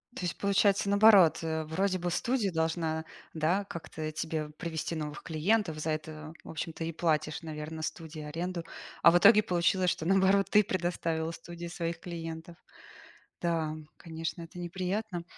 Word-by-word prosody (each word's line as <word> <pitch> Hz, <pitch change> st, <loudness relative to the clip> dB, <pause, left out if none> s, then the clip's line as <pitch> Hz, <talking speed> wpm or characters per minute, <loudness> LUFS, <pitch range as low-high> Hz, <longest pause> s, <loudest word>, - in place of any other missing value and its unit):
То -, -, -6 dB
есть 175 Hz, -, -3 dB
получается 200 Hz, 0 st, +2 dB
наоборот, 200 Hz, -4 st, +7 dB
э, 160 Hz, -1 st, -2 dB
вроде 185 Hz, +5 st, 0 dB
бы 175 Hz, 0 st, -2 dB
студия 235 Hz, -1 st, 0 dB
должна, 160 Hz, -1 st, -1 dB, 0.3 s
да, 165 Hz, +5 st, +1 dB
как-то 155 Hz, -3 st, -6 dB
тебе 155 Hz, -1 st, -3 dB
привести 160 Hz, +1 st, -4 dB
новых 150 Hz, -2 st, -5 dB
клиентов. 165 Hz, 0 st, +1 dB
За 155 Hz, -, -2 dB
это, 155 Hz, 0 st, -5 dB
в -, -, -12 dB
общем-то, 165 Hz, +1 st, -5 dB
и 165 Hz, -, -2 dB
платишь, 155 Hz, -1 st, 0 dB
наверно, 155 Hz, 0 st, -6 dB
студии 155 Hz, 0 st, -5 dB
аренду. 170 Hz, +3 st, -4 dB, 0.4 s
А 170 Hz, -, +8 dB
в 175 Hz, -, +5 dB
итоге 210 Hz, +3 st, +8 dB
получилось, 180 Hz, +1 st, +2 dB
что, 160 Hz, -, -2 dB
наоборот, 195 Hz, +1 st, +4 dB
ты 210 Hz, 0 st, +6 dB
предоставила 170 Hz, -3 st, -1 dB
студии 170 Hz, +1 st, -8 dB
своих 170 Hz, -1 st, -4 dB
клиентов. 165 Hz, -1 st, -7 dB, 0.8 s
Да, 165 Hz, -3 st, 0 dB, 0.2 s
конечно, 165 Hz, +1 st, -5 dB
это 170 Hz, +2 st, -10 dB
неприятно. 185 Hz, +1 st, -3 dB
170 Hz, 150 wpm, -30 LUFS, 160-185 Hz, 0.8 s, А